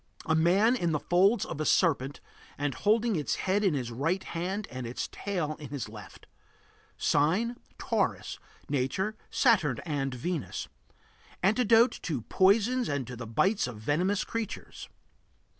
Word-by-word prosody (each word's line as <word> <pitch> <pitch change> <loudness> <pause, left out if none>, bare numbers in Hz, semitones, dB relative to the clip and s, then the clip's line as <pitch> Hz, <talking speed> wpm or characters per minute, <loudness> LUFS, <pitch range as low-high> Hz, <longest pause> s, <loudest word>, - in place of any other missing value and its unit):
A 160 - +1
man 185 +9 +4
in 170 -9 0
the 150 - +1
folds 195 +7 +3
of 150 - -5
a - - +1
serpent 145 -5 +2 0.4
and 145 -1 -1
holding 215 - +2
its 150 -3 -1
head 195 +2 0
in 185 -7 +2
his 125 -3 -3
right 165 +11 -1
hand 190 +5 -3
and 125 -1 -5
its 120 - -4
tail 175 -7 -3
in 145 -4 -8
his 140 -5 -4
left. 105 -1 -12 0.7
Sign: 185 +12 +2 0.2
Taurus. - - -1 0.3
Nature: 170 +11 -1
Saturn 190 - +3
and 135 -5 -2
Venus. 165 +4 -3 0.8
Antidote 225 +4 +4
to 140 -9 -3
poisons 220 - +3
and 140 -3 -1
to 125 - -7
the 115 -1 -7
bites 190 - +1
of 120 -3 -7
venomous 170 - 0
creatures. 230 -2 -6
170 Hz, 145 wpm, -29 LUFS, 140-205 Hz, 0.8 s, man